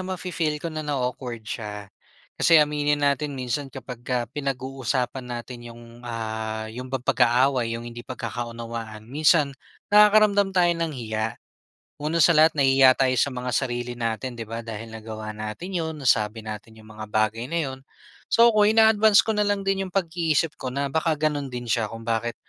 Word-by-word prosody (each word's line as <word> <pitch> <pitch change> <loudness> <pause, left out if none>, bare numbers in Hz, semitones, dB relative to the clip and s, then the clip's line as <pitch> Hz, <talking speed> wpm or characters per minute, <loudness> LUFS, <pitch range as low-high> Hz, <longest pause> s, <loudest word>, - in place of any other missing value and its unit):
mafi-feel 180 -4 -2
ko 165 +2 -5
na 155 - -3
nao-awkward 125 -5 -3
siya. 105 -2 -6 0.5
Kasi 165 - +6
aminin 150 -1 +2
natin 140 0 0
minsan, 130 +2 -3
kapagka 125 -2 -4
pinag-uusapan 130 -2 -3
natin 120 0 -6
'yong, 115 0 -13
ah, 110 -2 -4
'yong 125 +2 -7
bang 130 -1 -4
pag-aaway, 125 -1 +2
'yong 115 - -8
hindi 120 0 -8
pagkakaunawaan, 115 -2 -6
minsan 150 +3 +3 0.4
nakakaramdam 210 -2 +5
tayo 175 -1 +4
ng 165 -1 -2
hiya. 110 -2 -3 0.7
Una 155 +3 0
sa 170 - +6
lahat, 155 0 +5
nahihiya 135 -1 +6
tayo 130 -1 +3
sa 140 - +2
mga 125 0 -4
sarili 120 -2 -2
natin 115 +2 -3
'di 115 - -3
ba 115 +1 -4
dahil 115 0 -7
nagawa 110 -1 -7
natin 110 - -6
'yon, 160 -1 -3
nasabi 110 -3 +1
natin 110 +1 -8
'yong 110 - -15
mga 110 0 -8
bagay 110 +2 0
na 170 - -4 0.2
'yon. 130 - -8 0.5
So, 235 +1 +7
ako 210 -1 +4
ina-advance 220 -1 +5
ko 225 - -3
na 210 - +3
lang 205 -1 0
din 195 0 0
'yong 180 - -13
pag-iisip 165 -4 0
ko 130 - -3
na 140 0 -1
baka 160 0 +1
gano'n 150 -2 0
din 125 -1 -6
siya, 110 0 +1
kung 115 0 -8
bakit 115 +1 -1
130 Hz, 170 wpm, -24 LUFS, 115-155 Hz, 0.7 s, So